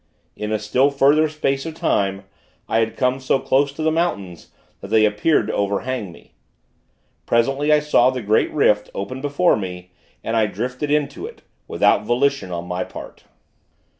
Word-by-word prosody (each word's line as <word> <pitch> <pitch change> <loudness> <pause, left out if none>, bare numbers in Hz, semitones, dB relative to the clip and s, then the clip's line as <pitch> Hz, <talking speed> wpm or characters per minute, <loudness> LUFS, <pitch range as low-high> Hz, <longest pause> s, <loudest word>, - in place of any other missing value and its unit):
In 105 0 -4
a 110 - +1
still 125 +7 +2
further 145 +3 +3
space 135 -3 -1
of 160 -1 -6
time, 100 -9 0 0.4
I 115 - +1
had 110 -1 -1
come 125 +1 +1
so 130 +1 +1
close 140 +1 +1
to 155 - -5
the 160 - +2
mountains, 100 - -2 0.3
that - - -9
they 110 +1 +4
appeared 105 +5 +2
to 110 - -4
overhang 100 +1 -2
me. - - -18 0.9
Presently, 135 +6 +1
I 150 0 +5
saw 140 -4 +4
the 130 -2 -4
great 105 +2 +2
rift, 105 -8 +2
open 130 +7 -5
before 145 +3 +2
me, 90 -3 -6 0.3
and 115 - -2
I 110 -2 +3
drifted 125 +8 -4
into 145 -1 -1
it; - - -14 0.2
without - - +3
volition 125 -2 0
on 85 0 -4
my 90 +1 -3
part. - - -11
125 Hz, 170 wpm, -21 LUFS, 105-140 Hz, 0.9 s, I